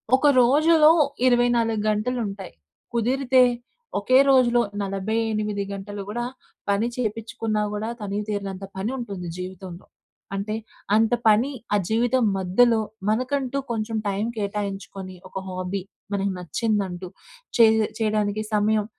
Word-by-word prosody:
ఒక 290 +3 +3
రోజులో 305 +5 +5 0.4
24 240 -3 +3
గంటలుంటాయి. 210 -3 -2 0.4
కుదిరితే 255 +2 +3 0.6
ఒకే 255 +6 +4
రోజులో 245 -3 +5 0.2
48 210 +1 -1
గంటలు 200 +1 -6
కూడా 240 +3 -2 0.5
పని 200 +3 +2
చేపిచ్చుకున్నా 225 -2 -2
కూడా, 210 +2 -3
తనివి 205 0 -3
తీరనంత 200 -2 -4
పని 200 +5 -2
ఉంటుంది 200 -8 -5
జీవితంలో. 185 -1 -8 0.5
అంటే 205 +2 -2 0.4
అంత 225 +1 +3 0.2
పని 220 +6 +4 0.2
ఆ - - +5
జీవితం 240 +3 +2
మధ్యలో 220 +5 +3 0.3
మనకంటూ 255 +4 0
కొంచెం 225 0 -2
టైం 200 +2 -1
కేటాయించుకొని, 200 -2 -4
ఒక - - -27
హాబీ 185 +1 -3 0.3
మనకు 200 -1 0
నచ్చిందంటూ 185 0 -2 0.5
చేయ్ 220 -1 +6 0.2
చేయడానికి 215 -1 0
సమయం 210 0 +2
215 Hz, 110 wpm, -24 LUFS, 200-235 Hz, 0.6 s, చేయ్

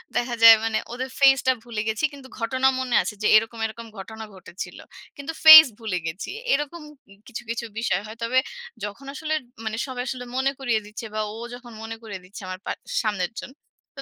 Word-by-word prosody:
দেখা 240 0 0
যায় 225 0 +12
মানে 225 -1 0 0.2
ওদের 260 +2 -4
ফেইসটা 270 -1 +5
ভুলে 230 -3 -4
গেছি। 220 +7 -2
কিন্তু 275 -2 -12
ঘটনা 260 +3 +1
মনে 255 -3 -1
আছে 185 - -4
যে - - +3
এরকম, 225 +1 +2
এরকম 230 +1 -7
ঘটনা 220 +3 -8
ঘটেছিল। 185 0 -9 0.4
কিন্তু 285 +3 -6
ফেইস 315 -1 +12
ভুলে 215 -5 -2
গেছি। 160 +4 -5 0.2
এরকম 295 +4 -2 0.3
ই - - -19
কিছু, 245 - -7
কিছু 235 0 -3
বিষয় 195 -5 0
হয়। 220 +1 -10
তবে 250 +3 0 0.5
যখন 205 +6 -6
আসলে 310 +1 -3 0.3
মানে 220 0 -3
সবাই 250 -1 -4
আসলে 250 0 -5
মনে 270 +1 +2
করিয়ে 240 -5 +1
দিচ্ছে 210 +2 -8
বা 215 - 0
ও - - -8 0.2
যখন 245 -1 -11
মনে 225 0 -6
করিয়ে 205 -4 -7
দিচ্ছে 195 +3 -11
আমার 185 0 -6
পা - - -2 0.3
সামনের 205 -2 -1
জন। 260 - -9 0.5
তো 275 - -6
230 Hz, 195 wpm, -24 LUFS, 215-260 Hz, 0.5 s, যায়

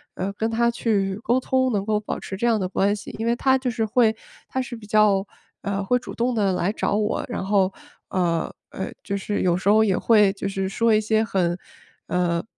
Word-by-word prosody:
呃， 195 +2 -3
跟 220 +2 -1
她 235 +1 +2
去 200 -5 0
沟 245 +2 +2
通 260 0 +1
能 200 -2 -1
够 215 -1 +1
保 - - -4
持 190 - -6
这 235 - -2
样 225 -2 +3
的 185 - -1
关 200 +2 +1
系。 205 - -9
因 225 - -2
为 235 +1 +2
她 265 0 +3
就 255 -2 -2
是 225 -2 -1
会 220 0 +3 0.3
她 260 - -2
是 250 -1 -6
比 220 -2 -11
较， 210 -2 +3 0.4
呃， 200 0 -2
会 250 +6 +2
主 - - -9
动 245 +1 0
地 200 -3 +2
来 180 +2 0
找 205 - -1
我， 210 0 0
然 215 - -3
后， 195 -1 +2 0.4
呃， 170 -3 0 0.2
呃， 190 - -5
就 200 - -3
是 205 +1 -2
有 175 -2 +3
时 190 +2 0
候 220 +1 +6
也 195 -4 +2
会 210 -4 +4
就 195 - -4
是 195 -1 -2
说 230 +2 +2
一 - - +4
些 220 +1 +2
很， 180 -4 0 0.5
呃， 170 -1 0
210 Hz, 245 characters per minute, -23 LUFS, 195-230 Hz, 0.5 s, 候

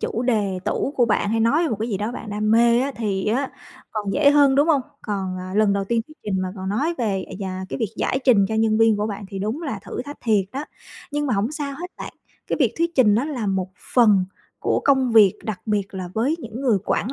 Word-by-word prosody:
chủ 230 - -2
đề 210 -6 0
tủ 280 - -1
của 245 - +4
bạn, 205 -1 +1
hay 225 0 +1
nói 230 +9 +3
về 335 - +1
một 225 - -1
cái 225 - -1
gì 205 - -1
đó 210 +4 -3
bạn 225 - -7
đam 210 +1 -1
mê 235 +1 +5
á, 275 +2 -1
thì 200 -4 -2
á, 255 +6 0 0.4
còn 210 -2 -2
dễ 290 -1 +5
hơn, 285 -2 +5
đúng 285 +4 +3
hông? 300 -4 +4 0.2
Còn, 190 -3 -3
à, 185 0 -7
lần 210 -1 +3
đầu 200 0 0
tiên 230 +3 0
thuyết 310 - -17
trình, 190 -2 -1
mà 185 - -2
còn 190 0 -5
nói 285 - 0
về, 195 -5 -1
à, - - -8
già 190 -2 -4
cái - - -4
việc 225 -5 -1
giải 260 - 0
trình 225 -7 +5
cho 220 - -2
nhân 220 0 +2
viên 225 -1 +4
của 210 +1 -1
bạn, 205 -1 -5
thì 195 - -6
đúng 220 - -3
là 270 -11 -3
thử - - -5
thách 290 +2 -9
thiệt 215 -4 +2
đó. 275 +3 -4 0.5
Nhưng 295 0 -1
mà 250 - +1
hổng 210 +8 0
sao 290 -2 -3
hết 360 +1 -6
bạn, - - -7 0.3
cái - - -1
việc - - +3
thuyết 335 0 +1
trình 220 -6 +5
nó 235 +5 +1
là 265 -8 -3
một 190 -1 -1 0.2
phần 210 -6 +5 0.3
của - - 0
công 265 -4 +3
việc, 210 -4 +7
đặc 215 -4 -4
biệt 205 -2 -1
là 185 -2 -5
với 260 +9 +1
những 235 -4 -7
người 245 -7 +2
quản 245 - -1
220 Hz, 265 wpm, -22 LUFS, 200-265 Hz, 0.5 s, việc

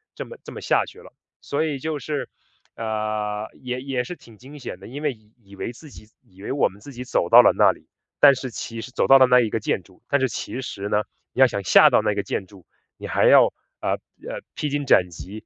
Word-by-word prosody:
这 - - -6
么 480 - -11
这 - - -10
么 - - -7
下 - - +2
去 - - -14
了。 465 - -15 0.3
所 145 +2 -1
以 150 -4 -2
就 155 +1 -3
是 145 +2 -4 0.5
呃， 110 -1 -3
也 125 0 -4
也 130 -2 -2
是 155 +8 -7
挺 115 -9 -18
惊 135 +6 -13
险 110 -8 -7
的， 95 - -12
因 140 +5 -8
为 150 - +1
以 110 -1 -25
以 100 -3 -16
为 105 - -5
自 150 +5 -14
己 110 - -14 0.2
以 95 0 -20
为 - - -4
我 140 - +2
们 100 - -17
自 140 - -11
己 125 +1 -7
走 85 -8 0
到 - - +10
了 - - +5
那 - - +6
里， - - -15 0.3
但 140 -1 +8
是 130 0 -5
其 115 0 -6
实 125 - -9
走 - - 0
到 135 - +9
了 130 - +7
那 125 0 +6
一 115 -3 +1
个 115 - -1
建 105 - -1
筑， 90 +1 -23
但 140 - +2
是 130 - +3
其 130 - -5
实 100 -6 -5
呢， 105 0 +1 0.3
你 - - -7
要 130 - +9
想 105 -4 -4
下 85 - +7
到 - - +3
那 105 - 0
个 100 0 -2
建 95 - -3
筑， 95 -2 -18 0.3
你 - - -7
还 - - +1
要， - - +8 0.3
呃， - - -1
呃， - - -8
披 150 - -2
荆 145 0 -2
斩 90 -8 +4
棘， 95 +6 -10
120 Hz, 280 characters per minute, -23 LUFS, 105-135 Hz, 0.5 s, 到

